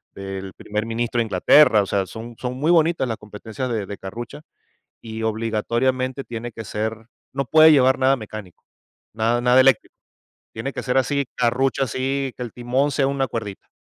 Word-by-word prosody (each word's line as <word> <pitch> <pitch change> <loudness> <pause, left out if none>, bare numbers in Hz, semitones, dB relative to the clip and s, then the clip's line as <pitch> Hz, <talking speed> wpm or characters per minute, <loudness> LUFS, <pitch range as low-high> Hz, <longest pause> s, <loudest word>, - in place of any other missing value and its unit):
del 95 -1 -6
primer 105 +1 -4
ministro 120 +1 -2
de 115 - +2
Inglaterra. 110 +3 +5
O - - -2
sea, 100 0 0
son 115 +1 -9
son 125 0 -3
muy 150 +6 +1
bonitas 165 -4 +3
las 115 -2 -3
competencias 110 +5 -6
de 110 -4 -2
de 100 +1 -7
Carrucha, 120 +9 -8 0.6
y 110 0 -7
obligatoriamente 120 +4 -1
tiene 120 0 -6
que 110 +1 -8
ser 110 +2 -3 0.4
no 140 +1 -2
puede 155 +2 +7
llevar 130 -1 +4
nada 135 +1 +3
mecánico, 110 -5 -10 0.5
nada 115 +2 +1
nada 125 +1 +5
eléctrico. 130 -3 +3 0.6
Tiene 125 +5 -4
que - - -5
ser 125 0 +1
así, 140 +1 0
Carrucha, 125 +3 +1
así, 135 +2 -2
que - - -6
el 120 - -6
timón 125 +4 0
sea 135 0 +1
una 140 -1 0
cuerdita. 110 -4 -6
120 Hz, 180 wpm, -22 LUFS, 110-135 Hz, 0.6 s, puede